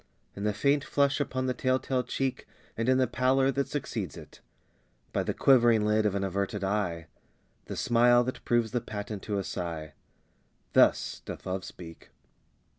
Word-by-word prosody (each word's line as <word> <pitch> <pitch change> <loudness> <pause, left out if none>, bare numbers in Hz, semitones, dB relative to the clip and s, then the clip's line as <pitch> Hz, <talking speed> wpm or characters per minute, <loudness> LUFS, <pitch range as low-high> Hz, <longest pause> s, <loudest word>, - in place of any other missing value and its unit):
In 100 - -4
the 105 - +2
faint 140 +6 +2
flush 140 0 +1
upon 130 -2 -2
the 130 - 0
tell 130 +1 +1
tale 130 0 -1
cheek, 130 +1 -3 0.3
And 115 +2 -1
in 130 - +4
the 130 - +3
pallor 130 +2 +2
that 140 +1 -1
succeeds 110 - -4
it; - - -13 0.7
by - - +1
The - - -2
quivering 120 -5 +5
lid 105 0 +3
of 100 - -1
an 100 - -1
averted 100 +1 -2
eye 95 -5 -1 0.6
The - - -6
smile 120 +1 +4
that 130 +1 -5
proves 120 -2 +1
the 120 - -1
patent 105 -1 -6
to 105 -2 -3
a 100 - -1
sigh 85 -5 -5 0.8
Thus - - +3
doth - - -8
Love 95 0 -3
speak. 80 -2 -11
115 Hz, 175 wpm, -28 LUFS, 100-130 Hz, 0.8 s, quivering